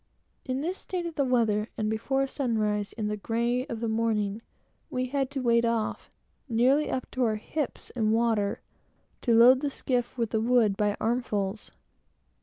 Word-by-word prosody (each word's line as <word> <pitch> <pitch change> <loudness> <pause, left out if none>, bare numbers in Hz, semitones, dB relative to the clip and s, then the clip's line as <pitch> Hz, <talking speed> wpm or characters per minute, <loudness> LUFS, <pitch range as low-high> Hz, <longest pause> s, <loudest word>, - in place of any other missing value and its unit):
In 260 0 -2
this 355 +5 -3
state 360 -2 -4
of 340 - -4
the 285 - +1
weather 225 -4 +1
and 215 - -1
before 270 +5 0
sunrise, 215 -7 -1
in 215 -2 -3
the 210 - -1
grey 235 +5 -1
of 230 -5 -5
the 230 - -1
morning, 220 -2 0 0.5
we 255 -4 -1
had 270 -1 0
to 275 -1 -4
wade 235 -1 +3
off, 230 -2 -1 0.4
nearly 255 +6 +3
up 255 - -2
to 255 - 0
our 220 -2 +2
hips 280 +6 -4
in 220 -3 0
water, 225 -3 +1 0.6
to 235 -3 +3
load 245 +3 +7
the 290 +1 -1
skiff 250 -2 -2
with 230 -2 -1
the 220 - +1
wood 230 -3 +3
by 205 0 +1
armsfull. 215 -4 -1
235 Hz, 175 wpm, -28 LUFS, 215-255 Hz, 0.6 s, load